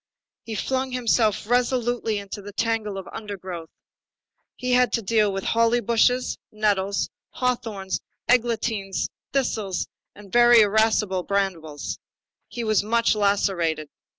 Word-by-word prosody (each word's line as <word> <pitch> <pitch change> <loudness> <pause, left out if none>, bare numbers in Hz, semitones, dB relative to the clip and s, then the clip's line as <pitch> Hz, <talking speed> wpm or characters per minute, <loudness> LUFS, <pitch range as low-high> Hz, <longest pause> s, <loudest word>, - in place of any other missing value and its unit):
He 225 - -5
flung 260 +4 -1
himself 225 -4 +1
resolutely 245 -2 +1
into 200 0 -6
the 205 +1 -9
tangle 225 -2 -1
of 190 - -7
undergrowth. 185 -6 -7 0.9
He 250 0 -3
had 250 0 +4
to 230 - 0
deal 210 0 +2
with 195 0 -3
holly 230 +1 +3
bushes, 240 +2 +2
nettles, 200 -2 0 0.2
hawthorns, 225 -6 -2 0.3
eglantines, 225 -5 +1 0.2
thistles, 215 -9 -1 0.3
and 205 -2 -14
very 240 -1 +7
irascible 210 -2 +2
brambles. 175 -7 -2 0.5
He 240 - -5
was 215 -2 +2
much 230 +2 +2
lacerated. 190 -7 +1
215 Hz, 120 wpm, -24 LUFS, 195-240 Hz, 0.9 s, very